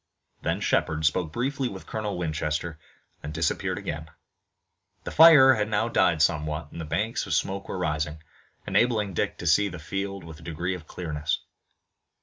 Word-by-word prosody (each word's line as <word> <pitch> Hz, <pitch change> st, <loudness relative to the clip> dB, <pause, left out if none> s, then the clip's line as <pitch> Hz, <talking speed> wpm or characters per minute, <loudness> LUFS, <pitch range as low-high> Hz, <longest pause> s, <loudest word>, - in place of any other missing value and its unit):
Then -, -, -1 dB
Shepard 80 Hz, 0 st, +1 dB
spoke 80 Hz, +1 st, +1 dB
briefly 130 Hz, -, -1 dB
with 95 Hz, -3 st, -9 dB
Colonel 105 Hz, -3 st, -3 dB
Winchester, 80 Hz, -1 st, -2 dB, 0.4 s
and 75 Hz, -, -6 dB
disappeared 80 Hz, +1 st, -1 dB
again. 75 Hz, +1 st, -5 dB, 0.9 s
The -, -, -5 dB
fire 150 Hz, -5 st, +9 dB
had 105 Hz, -2 st, -1 dB
now 110 Hz, +2 st, +1 dB
died 80 Hz, -8 st, +3 dB
somewhat 75 Hz, -1 st, -1 dB
and 85 Hz, -, -7 dB
the -, -, -5 dB
banks 105 Hz, +9 st, -1 dB
of 85 Hz, -, 0 dB
smoke 100 Hz, +3 st, -2 dB
were -, -, -3 dB
rising, 80 Hz, -3 st, -2 dB, 0.4 s
enabling 110 Hz, -5 st, +1 dB
Dick -, -, -1 dB
to -, -, -7 dB
see 95 Hz, +6 st, +4 dB
the 90 Hz, -, -7 dB
field 95 Hz, +3 st, -4 dB
with 80 Hz, -1 st, -10 dB
a -, -, -15 dB
degree 85 Hz, +3 st, -3 dB
of 85 Hz, -4 st, -8 dB
clearness. 75 Hz, -4 st, -3 dB
85 Hz, 165 wpm, -26 LUFS, 80-105 Hz, 0.9 s, fire